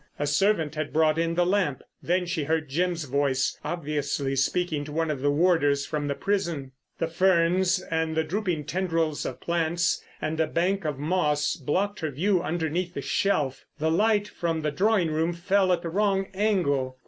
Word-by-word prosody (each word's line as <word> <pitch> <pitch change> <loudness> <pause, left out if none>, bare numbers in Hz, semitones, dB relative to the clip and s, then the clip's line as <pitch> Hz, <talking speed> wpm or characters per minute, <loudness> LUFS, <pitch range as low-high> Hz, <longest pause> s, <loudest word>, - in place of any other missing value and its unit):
A 145 - -1
servant 160 0 +2
had 155 -1 -3
brought 155 0 +3
in 165 0 0
the 175 0 +3
lamp. 180 -8 0 0.2
Then 180 +1 +1
she 170 -4 -2
heard 155 -1 -1
Jim's 170 +3 0
voice, 140 -1 0
obviously 145 -4 -2
speaking 155 +2 0
to 150 - -8
one 160 +1 0
of 140 -3 -4
the 145 - +2
warders 145 -3 +2
from 150 -1 -3
the 140 - -1
prison. 170 -10 -2 0.3
The - - 0
ferns 185 +2 +3
and 160 -2 -2
the 160 - +3
drooping 175 -2 -2
tendrils 165 -1 -1
of - - -6
plants 170 +1 0 0.2
and 155 +1 -3
a 160 - +2
bank 180 +3 0
of 150 -3 -2
moss 150 -1 +1
blocked 185 +7 -1
her 160 -3 -2
view 180 +6 +1
underneath 170 +2 -2
the - - -3
shelf; 150 -9 0
the 160 +1 0
light 210 +3 +2
from 165 -4 -2
the 150 - 0
drawing 190 +1 +2
room 160 +2 0
fell 185 +2 +2
at 175 0 +1
the 170 - -3
wrong 195 +1 +1
angle. 150 -11 0
165 Hz, 185 wpm, -26 LUFS, 150-185 Hz, 0.3 s, brought